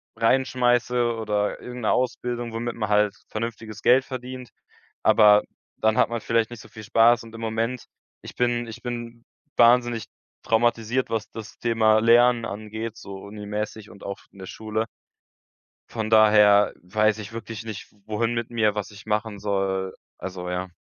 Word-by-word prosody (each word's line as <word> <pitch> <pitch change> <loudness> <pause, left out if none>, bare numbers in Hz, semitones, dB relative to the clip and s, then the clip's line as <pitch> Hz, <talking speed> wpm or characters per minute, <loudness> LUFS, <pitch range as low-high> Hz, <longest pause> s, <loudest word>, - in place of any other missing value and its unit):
reinschmeiße 125 -1 +2
oder 105 -2 -1
irgendeine 125 -3 -2
Ausbildung, 120 -2 -2
womit 120 +1 -3
man 105 -2 -3
halt 105 -1 +3
vernünftiges 110 -1 -5
Geld 130 +2 +5
verdient. 125 -1 -7 0.5
Aber 105 -1 +6 0.3
dann 110 0 +2
hat - - +4
man 115 -1 -3
vielleicht 115 0 +1
nicht 120 -1 -9
so - - -15
viel 110 - -11
Spaß. 115 +2 +4
Und 115 0 -13
im 115 - -8
Moment 115 +2 -2 0.4
ich - - -10
bin 120 -1 0
ich 115 - -9
bin 120 -1 -6 0.3
wahnsinnig 120 -1 +4 0.4
traumatisiert, 120 +2 +1
was 110 -1 -2
das 110 -2 -9
Thema 110 -2 +3
Lernen 120 +1 +5
angeht, 110 +2 -6
so 100 -1 -9
Uni 105 0 -9
mäßig 105 0 -4
und 100 - -14
auch 100 0 -5
f - - -23
in 100 - -18
der 95 - -7
Schule. 110 +2 -3 1.0
Von 110 -2 -3
daher 105 -2 +6
weiß 110 +4 +1
ich 105 +1 -8
wirklich 115 -1 -7
nicht, 110 -3 -7 0.2
wohin 115 +2 -1
mit 115 -1 -3
mir, 110 -3 +1
was 105 -1 -4
ich 105 +1 -13
machen 105 -1 -2
soll 95 -2 -1 0.2
Also, 90 -1 -6
ja. 90 +1 -2
110 Hz, 165 wpm, -24 LUFS, 105-120 Hz, 1.0 s, Aber